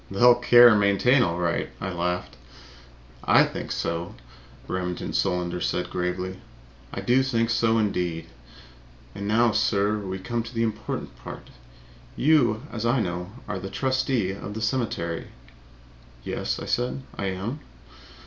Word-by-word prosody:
"They'll 120 +6 +6
care 120 0 +7
and 105 -2 +4
maintain, 100 +6 +4
all 85 -7 +1
right!" 85 -1 -1
I 95 - -3
laughed. 90 +1 -2 0.9
"I - - +6
think - - -5
so," 85 +1 -3 0.5
said - - -22
Remington 90 -1 -3
Solander 90 0 0 0.3
gravely. 90 +1 -3 0.5
"I 95 - -5
do 125 +6 +3
think 115 -3 0
so, 115 -1 +2
indeed! 90 -6 -1 0.9
And 100 - -5
now, 115 +2 +4
sir, 105 0 +1
we 95 -2 -4
come 115 +5 -2
to 115 +1 -9
the 115 - +1
important 110 -1 -4
part. - - -10 0.6
You, 125 -7 +3
as 115 -2 -4
I 120 +2 +2
know, 90 -3 -3 0.2
are 105 -2 -3
a 95 +1 -6
trustee 130 -6 0
of 100 +1 -7
the - - -3
cemetery." 110 -8 -2 1.0
"Yes," - - -2
I - - -6
said, 125 +2 -1
"I 100 - -3
am." 100 +9 -3
105 Hz, 145 wpm, -25 LUFS, 90-120 Hz, 1.0 s, care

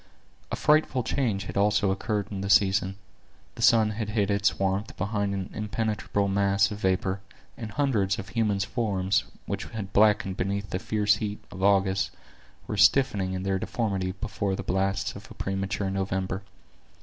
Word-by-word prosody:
A - - 0
frightful 150 -4 +3
change 115 -4 0
had - - -7
also 105 0 +3
occurred 105 +1 -2
in 95 -2 -4
the 100 - -3
season. 95 -1 +3 0.6
The - - -9
sun 110 -2 +5
had 110 0 -4
hid 105 -2 +1
its 100 0 +2
warmth 95 +2 -1
behind 100 0 -1
an 95 -1 -4
impenetrable 105 -1 -1
mass 100 0 +2
of 105 - -5
vapor, 95 0 0 0.4
and 115 -3 -6
hundreds 105 -6 +1
of 95 +2 -7
human 110 -4 0
forms, 100 -3 0 0.2
which 100 +2 -3
had 100 -4 -7
blackened 105 -2 +3
beneath 100 +2 -2
the 90 - -1
fierce 105 0 +2
heats 105 -1 -5
of 95 - -8
August, 95 -1 +3 0.6
were 105 - -4
stiffening 100 -5 +4
in 95 0 -3
their 95 -1 0
deformity 95 -4 -2
before 100 -1 -2
the 95 - -5
blasts 95 +1 0
of - - -11
a - - -12
premature 95 +1 -2
November. 95 -1 -2
100 Hz, 165 wpm, -27 LUFS, 95-105 Hz, 0.6 s, sun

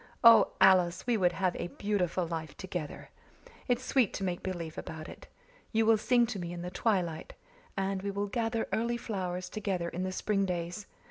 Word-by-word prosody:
Oh, 230 -3 +8
Alice, 185 -2 +5
we 240 -1 +2
would 180 -4 +2
have 185 0 0
a - - -3
beautiful 185 -2 -1
life 160 -2 -5
together! 180 -5 -6 0.6
It's 245 0 +1
sweet 255 -7 +2
to 195 - -3
make 180 -2 -2
believe 170 -4 -4
about 155 -1 -7
it. - - -11 0.4
You 225 -1 +2
will 220 -1 +5
sing 240 +1 +4
to 200 - -5
me 175 -1 -4
in 175 0 -6
the 180 - -5
twilight, 180 -6 -1 0.4
and 195 0 -1
we 200 - -3
will 200 +1 -1
gather 225 +2 -1
early 235 +1 0
flowers 185 -5 -3
together 190 -4 -2
in 175 - -4
the 185 0 -1
spring 195 +1 0
days. 175 +3 -4
190 Hz, 190 wpm, -31 LUFS, 175-215 Hz, 0.6 s, Oh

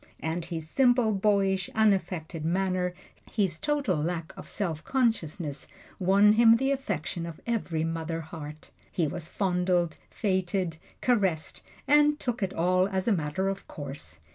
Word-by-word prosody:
And 165 +1 -3
his 160 -2 -5
simple, 245 +1 +3
boyish, 195 -2 +2
unaffected 180 -7 +1
manner 180 +1 0 0.4
his 190 -7 0
total 285 - 0
lack 165 0 -3
of - - -10
self 165 -7 -2
consciousness 180 - -1 0.3
won 200 +3 +5
him 230 0 +7
the 270 +4 +1
affection 180 - -2
of 165 -2 -8
every 185 -9 -1
mother 165 0 -2
heart. 155 -1 -9 0.2
He 170 - +1
was 170 +1 -5
fondled, 180 -3 0
feted, 185 -4 -1 0.2
caressed, 195 -10 +1 0.3
and 295 +1 +5
took 245 -3 -2
it 190 -1 0
all 185 +2 +2
as 190 0 -2
a 225 - +4
matter 170 +2 -1
of 195 0 -3
course. 135 - -8
185 Hz, 140 wpm, -28 LUFS, 165-210 Hz, 0.4 s, him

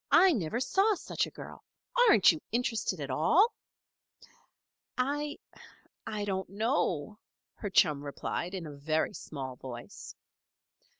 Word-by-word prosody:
"I 380 - +7
never 210 - -1
saw 390 - +2
such - - -2
a - - -8
girl. - - -11 0.5
Aren't 205 - +7
you 160 - -6
interested 225 -6 -1
at 140 -2 -4
all?" 340 - +4 1.4
"I 290 +3 -1 0.7
I 210 -1 -3
don't 190 -1 -2
know," 210 - -1 0.4
her 205 - -4
chum 150 -6 +3
replied 170 +5 -4
in 180 -3 -5
a 150 - -7
very 155 +3 -1
small 130 -4 -7
voice. 120 -2 -9
190 Hz, 125 wpm, -30 LUFS, 150-250 Hz, 1.4 s, I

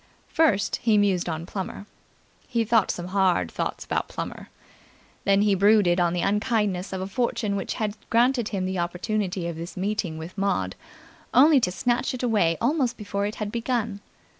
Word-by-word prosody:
First, 300 - +2
he 220 -2 +2
mused 195 -4 +2
on 160 0 -4
Plummer. 195 +2 -6 0.6
He 230 -2 0
thought 225 -2 +3
some 175 +1 -3
hard 185 - +2
thoughts - - -3
about - - -1
Plummer. - - -6 0.8
Then 200 +1 +4
he 210 -1 +3
brooded 195 -2 +4
on 175 -1 +2
the 175 - -1
unkindness 210 -3 0
of 190 -1 -3
a - - -2
fortune 215 -2 -1
which 195 - -3
had 210 -2 -2
granted 240 0 +3
him 190 -3 -2
the 185 -1 -2
opportunity 180 +1 -2
of 170 -2 -5
this 170 +3 -7
meeting 190 -4 -2
with 160 +3 -8
Maud, 195 - -1 0.6
only 285 +3 +7
to 180 -7 0
snatch 245 +6 0
it 255 - -6
away 205 -9 +2
almost 250 -2 +1
before 200 -1 -2
it 210 - -5
had 210 -1 -4
begun. 235 -3 -2
200 Hz, 175 wpm, -25 LUFS, 180-230 Hz, 0.8 s, only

